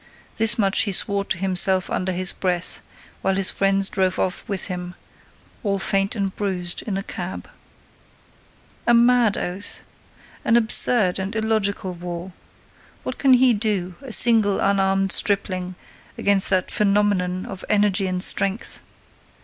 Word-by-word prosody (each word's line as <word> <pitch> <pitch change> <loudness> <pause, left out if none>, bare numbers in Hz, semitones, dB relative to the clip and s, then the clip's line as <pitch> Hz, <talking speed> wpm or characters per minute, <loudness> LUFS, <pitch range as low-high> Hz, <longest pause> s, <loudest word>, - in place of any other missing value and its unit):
This 225 -1 +2
much 195 -3 +2
he 205 - 0
swore 200 +2 0
to 175 - -2
himself 185 0 +2
under 185 +1 -2
his 185 +1 -3
breath, 180 -2 -2 0.4
while 195 0 0
his 195 -1 +1
friends 195 0 +1
drove 190 -2 -1
off 185 - -2
with 195 -2 0
him, 180 -1 -6 0.7
all 200 -2 -1
faint 195 +1 0
and 195 -3 -3
bruised, 180 -4 -1
in 200 -3 -4
a 195 - -4
cab. 185 -1 -7 1.4
A 240 - +5
mad 240 -2 +3
oath! 185 +3 -2 0.6
An 230 - +3
absurd 220 -4 +3
and 190 +3 -5
illogical 215 -4 -1
war! 175 +1 -7 0.7
What 255 - -6
can 270 -2 +4
he 250 0 +5
do, 205 -4 -1
a 270 -3 -9
single, 220 -4 +5
unarmed 195 -1 +1
stripling, 185 -3 0 0.4
against 200 -1 +2
that 185 -1 0
phenomenon 200 -3 0
of 190 -1 -9
energy 205 -2 +2
and 185 0 -2
strength? 200 +2 0
195 Hz, 140 wpm, -21 LUFS, 185-210 Hz, 1.4 s, A